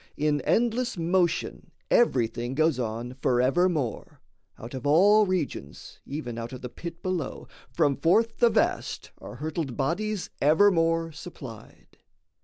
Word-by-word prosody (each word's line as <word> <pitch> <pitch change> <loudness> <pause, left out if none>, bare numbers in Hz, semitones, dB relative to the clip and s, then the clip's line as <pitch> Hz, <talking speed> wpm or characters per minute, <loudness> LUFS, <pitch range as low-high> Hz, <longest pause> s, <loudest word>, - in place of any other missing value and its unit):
In 150 -1 +1
endless 240 0 +1
motion 175 +1 0 0.2
everything 120 - +2
goes 155 -3 +2
on 120 +1 -3
Forevermore; 135 +2 +1 0.4
out 115 +3 -9
of 130 +1 -4
all 205 +8 +5
regions, 150 - -4
even 125 -5 -5
Out 115 +1 -6
of 130 - -8
the 125 - -6
pit 170 +5 -9
below, 185 -6 -3 0.2
from 140 -2 +2
forth 225 +10 +2
the 235 - +6
vast, 220 - -1
Are - - -9
hurtled 150 -1 -4
bodies 185 +8 -2
evermore 165 0 +3
supplied. 135 -8 -11
160 Hz, 125 wpm, -26 LUFS, 130-185 Hz, 0.4 s, the